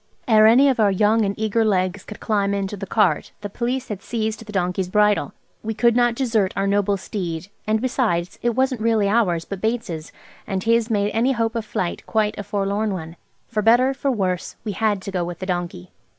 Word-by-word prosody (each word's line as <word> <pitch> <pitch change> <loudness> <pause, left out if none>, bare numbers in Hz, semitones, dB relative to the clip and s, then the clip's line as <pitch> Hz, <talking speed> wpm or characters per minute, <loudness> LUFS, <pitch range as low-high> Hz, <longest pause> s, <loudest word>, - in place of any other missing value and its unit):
Ere 215 -2 +6
any 255 +5 +6
of 265 -4 +1
our 210 -2 +5
young 210 +3 +3
and 200 -1 -2
eager 220 +1 +1
legs 185 -2 0
could 210 - -10
climb 200 -2 0
into 200 0 -3
the 195 -1 -7
cart 210 -2 +1
the 205 - -5
Police 250 +4 -2
had 205 -3 -5
seized 220 -1 -3
the 215 - -10
donkey's 180 -1 -1
bridle. 210 +1 +2 0.3
We 220 0 -4
could 235 +1 +3
not 240 -1 +3
desert 225 -7 0
our 195 - +1
noble 200 0 +1
steed–and 190 +3 -4
besides, 220 -8 -1
it 240 -1 0
wasn't 260 -2 +1
really 220 -2 +2
ours, 200 -6 +1
but 195 -2 -6
Bates's, 220 -9 -3 0.4
and 195 -2 -1
this 230 0 +2
made 205 -2 +1
any 245 +4 +2
hope 230 -2 -1
of 230 -2 -3
flight 180 -4 -3
quite 215 -1 +1
a - - -3
forlorn 205 +1 -1
one. 165 -2 -6 0.3
For 215 -2 -1
better, 240 +5 +4
for 275 +1 -2
worse, 185 -7 -1
we 215 - -3
had 205 -1 0
to 195 - -5
go 180 -2 -1
with 175 0 -5
the 185 - -6
donkey. 175 - -4
210 Hz, 210 wpm, -22 LUFS, 195-230 Hz, 0.4 s, Ere